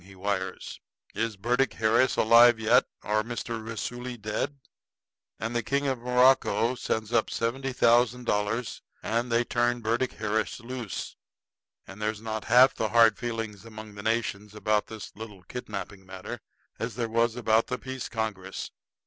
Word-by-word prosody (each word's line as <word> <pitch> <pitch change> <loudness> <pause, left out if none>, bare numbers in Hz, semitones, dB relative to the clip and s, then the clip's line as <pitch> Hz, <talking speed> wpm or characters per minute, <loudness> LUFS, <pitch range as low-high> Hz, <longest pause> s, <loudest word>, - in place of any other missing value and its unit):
he 95 +1 -15
wires. 95 -1 -3 0.3
'Is 115 -2 -2
Burdick 120 +6 +1
Harris 115 +3 +3
alive 115 +1 +6
yet, 115 +3 +4 0.2
or 105 +1 +1
Mr. 115 0 -5
Raisuli 120 +2 -5
dead?' 110 +7 -3 0.8
And 115 +2 -3
the 120 - +2
King 140 +5 -1
of 130 -3 0
Morocco 125 0 +3
sends 110 -2 -3
up 115 -2 +2
the - - -5
seventy 130 +4 -1
thousand 125 0 +3
dollars, 110 +2 -1 0.2
and 115 +2 -1
they 115 +1 +3
turn 120 0 0
Burdick 115 +3 0
Harris 110 0 -2
loose. 120 -3 -6 0.7
And 95 +2 -11
there's 105 0 -1
not 110 -1 -4
half 125 +3 +6
the 110 - -2
hard 115 -2 +5
feelings 115 -4 -4
among 110 -1 -10
the 100 - -8
nations 105 -2 -2
about 105 0 +1
this 110 -2 -9
little 105 -4 -10
kidnapping 100 -2 -7
matter 95 0 -7 0.4
as 115 -2 -3
there 115 -1 -1
was 115 +1 +1
about 115 -2 +2
the 125 - -2
peace 130 -1 -6
congress. 105 -4 -4
115 Hz, 155 wpm, -27 LUFS, 105-120 Hz, 0.8 s, alive